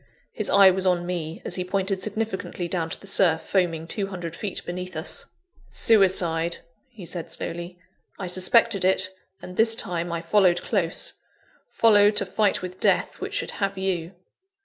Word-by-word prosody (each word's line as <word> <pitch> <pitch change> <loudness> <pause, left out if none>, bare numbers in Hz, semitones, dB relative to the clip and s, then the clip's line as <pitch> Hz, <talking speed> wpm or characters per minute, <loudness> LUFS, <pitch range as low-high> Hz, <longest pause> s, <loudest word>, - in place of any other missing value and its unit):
His - - -3
eye 195 -1 +7
was 190 0 +1
on 175 -1 +1
me, 170 -2 -4
as - - -3
he 180 - -1
pointed 190 +1 -1
significantly 205 -3 -3
down 165 -2 -2
to - - -5
the - - -14
surf 180 -4 +2
foaming 170 -4 0
two 195 +2 -2
hundred 175 -4 -6
feet 200 -1 -4
beneath 180 0 -6
us. 160 - -2 0.4
"Suicide!" 175 -6 +2 0.3
he 220 -8 -11
said 170 -1 -5
slowly 175 +1 -5 0.4
"I 195 - -5
suspected 190 +3 +3
it, 185 0 +2 0.3
and, 180 - -9
this 225 0 +5
time, 175 -5 -3
I 170 -1 -2
followed 175 0 +3
close: 180 -7 0 0.6
followed, 210 -2 +4
to 200 - +3
fight 200 +1 0
with 185 0 -7
death, - - +1
which - - -5
should - - -1
have 195 -1 -2
you." 185 -2 -2
185 Hz, 170 wpm, -24 LUFS, 175-200 Hz, 0.6 s, eye